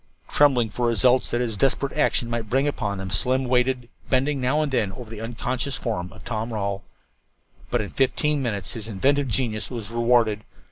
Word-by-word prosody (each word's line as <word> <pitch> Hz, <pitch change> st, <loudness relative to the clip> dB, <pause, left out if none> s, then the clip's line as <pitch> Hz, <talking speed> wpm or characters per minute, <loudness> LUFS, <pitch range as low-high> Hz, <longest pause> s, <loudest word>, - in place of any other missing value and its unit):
Trembling 130 Hz, -6 st, +4 dB
for 120 Hz, +3 st, -1 dB
the -, -, +3 dB
results 125 Hz, +2 st, +3 dB
that 120 Hz, -, 0 dB
his 115 Hz, -3 st, -1 dB
desperate 135 Hz, +4 st, +1 dB
action 145 Hz, -4 st, +1 dB
might 115 Hz, -2 st, -3 dB
bring 135 Hz, +4 st, +2 dB
upon 105 Hz, -8 st, -2 dB
them, 95 Hz, -1 st, -5 dB
Slim 130 Hz, +7 st, +2 dB
waited, 125 Hz, 0 st, +1 dB, 0.2 s
bending 135 Hz, +1 st, +1 dB
now 140 Hz, +5 st, +2 dB
and 150 Hz, -, -2 dB
then 105 Hz, -7 st, +1 dB
over 115 Hz, +1 st, -9 dB
the 110 Hz, -1 st, -7 dB
unconscious 125 Hz, +3 st, -3 dB
form 90 Hz, -7 st, -3 dB
of -, -, -14 dB
Tom 115 Hz, 0 st, -3 dB
Rawle. 100 Hz, -2 st, -2 dB, 0.9 s
But 120 Hz, -, +1 dB
in 100 Hz, -, -5 dB
fifteen 150 Hz, +2 st, +1 dB
more 130 Hz, -3 st, 0 dB
minutes 100 Hz, -3 st, -5 dB
his 110 Hz, -2 st, -7 dB
inventive 135 Hz, +7 st, +1 dB
genius 110 Hz, -2 st, 0 dB
was 115 Hz, -4 st, -6 dB
rewarded. 115 Hz, -3 st, +2 dB
120 Hz, 195 wpm, -24 LUFS, 110-130 Hz, 0.9 s, Trembling